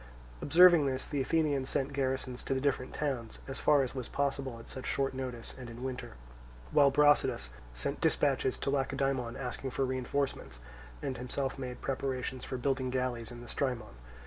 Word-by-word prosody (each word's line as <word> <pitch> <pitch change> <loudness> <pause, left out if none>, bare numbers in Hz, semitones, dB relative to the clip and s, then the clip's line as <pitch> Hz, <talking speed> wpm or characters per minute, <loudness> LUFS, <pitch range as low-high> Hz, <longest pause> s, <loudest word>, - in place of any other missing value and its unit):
Observing 170 -1 +7
this, 130 -1 -1
the 145 -2 -1
Athenians 145 -2 +1
sent 140 +1 -1
garrisons 130 -2 -1
to 135 - -1
the - - +1
different 130 -2 0
towns, 130 -7 -2
as 135 - -5
far 145 -2 +5
as 130 - -4
was 130 -3 -4
possible 140 -3 -1
at 115 - -12
such 130 -1 -6
short 135 -1 0
notice 125 -3 -5
and 125 -2 -8
in 120 +2 -8
winter; 130 - -4 0.6
while 145 -2 +6
Brasidas 145 - +3 0.2
sent - - -3
dispatches 135 -2 +2
to 135 - -1
Lacedaemon 135 -3 0
asking 130 +1 -4
for 135 +1 0
reinforcements, 130 - -2 0.5
and 130 - -2
himself 135 +2 -2
made 125 -2 -5
preparations 130 -1 -2
for 130 - -4
building 130 0 0
galleys 125 -3 -1
in 120 0 -9
the 120 - -10
Strymon. 125 - -2
130 Hz, 170 wpm, -32 LUFS, 125-140 Hz, 0.6 s, Observing